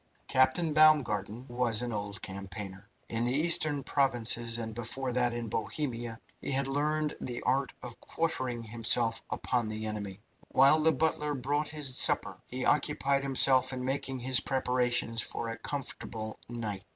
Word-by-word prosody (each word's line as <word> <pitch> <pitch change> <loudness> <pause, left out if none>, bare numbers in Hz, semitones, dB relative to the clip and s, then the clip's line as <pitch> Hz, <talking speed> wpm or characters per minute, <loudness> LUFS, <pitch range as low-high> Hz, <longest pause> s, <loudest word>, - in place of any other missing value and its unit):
Captain 130 +5 +2
Baumgarten 125 -8 +3
was 120 -2 +2
an 120 -2 -3
old 100 -1 -4
campaigner. 95 +1 -7 0.2
In 115 0 -2
the 120 +2 0
Eastern 155 -2 +3
provinces, 120 -4 +1
and 110 -1 -5
before 120 +3 -2
that 125 -1 +2
in 120 -1 -4
Bohemia, 120 -1 -4 0.2
he - - -3
had 135 0 +1
learned 150 +2 -1
the 120 -1 -5
art 135 +1 +1
of 120 -2 -9
quartering 130 -8 -2
himself 115 0 +2
upon 120 -3 -1
the 110 0 -4
enemy. 105 -2 -5 0.3
While 135 +4 +5
the 160 +1 +4
butler 150 0 -1
brought 145 +3 -1
his 145 -4 -2
supper - - +2
he 130 +1 -4
occupied 140 -1 +1
himself 130 -1 +4
in 125 0 -4
making 135 0 -2
his 130 0 +3
preparations 125 -3 0
for 115 - -4
a 115 - -5
comfortable 115 -5 -5
night. 110 -5 -4
125 Hz, 150 wpm, -30 LUFS, 115-140 Hz, 0.3 s, While